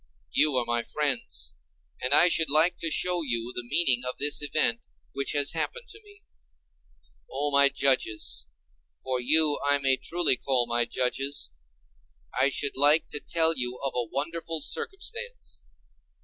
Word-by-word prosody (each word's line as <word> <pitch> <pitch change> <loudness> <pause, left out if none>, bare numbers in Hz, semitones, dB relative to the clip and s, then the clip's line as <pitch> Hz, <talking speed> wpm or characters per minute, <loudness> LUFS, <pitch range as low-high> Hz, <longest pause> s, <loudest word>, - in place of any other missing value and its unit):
You 150 - +2
are 125 -2 +1
my 120 0 -1
friends, 125 - -2 0.5
and 125 - -2
I 175 +5 +7
should 160 -3 +2
like 155 +5 +2
to 165 - -1
show 180 +2 +1
you 120 -4 -3
the - - -4
meaning 130 -1 +2
of 125 0 -4
this 145 +1 +1
event 140 -5 0 0.2
which 140 0 -2
has 145 -1 +3
happened 470 - -4
to 435 +1 -12
me. 410 0 -20 1.1
O 145 +2 -3
my 140 0 +5
judges—for 105 - -2
you 150 +3 +4
I 145 0 +3
may 135 -2 +1
truly 165 0 +1
call 130 -3 +1 0.2
judges—I 70 - -3
should 140 +1 -2
like 145 +4 +4
to 150 - -2
tell 165 +1 +1
you 125 -1 -3
of 135 - -2
a 125 - 0
wonderful 165 +2 -4
circumstance. 465 - -4
140 Hz, 145 wpm, -26 LUFS, 120-160 Hz, 1.1 s, I